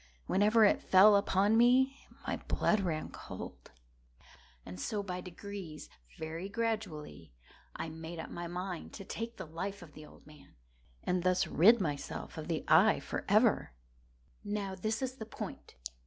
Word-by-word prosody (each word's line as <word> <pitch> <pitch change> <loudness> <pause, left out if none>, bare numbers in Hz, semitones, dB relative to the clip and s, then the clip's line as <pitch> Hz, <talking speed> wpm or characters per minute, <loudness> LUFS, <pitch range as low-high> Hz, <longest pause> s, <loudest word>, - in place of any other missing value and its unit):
Whenever 215 +3 +4
it 205 - +3
fell 205 +3 +7
upon 200 +1 +3
me, 255 +4 +4 0.2
my - - -1
blood 215 - +2
ran 165 -5 -2
cold; - - -9 1.0
and 90 0 -8
so 205 - -2
by 180 -2 -4
degrees—very 170 - -8
gradually—I 160 - -5
made 160 +2 -8
up 160 - -7
my 175 0 -5
mind 180 0 -5
to 195 - -8
take 230 +4 -5
the - - -6
life 185 +5 -5
of 155 -4 -14
the 155 0 -11
old - - -18
man, 150 -1 -17 0.5
and 180 0 0
thus 185 +1 +2
rid 220 +9 +6
myself 145 -7 -4
of 155 - -6
the 165 -3 -2
eye 185 +8 +6
forever. 215 - +2 0.7
Now 205 -2 -3
this 215 +6 -2
is 260 0 -3
the 220 - -6
point. 220 - -8
185 Hz, 145 wpm, -32 LUFS, 160-215 Hz, 1.0 s, fell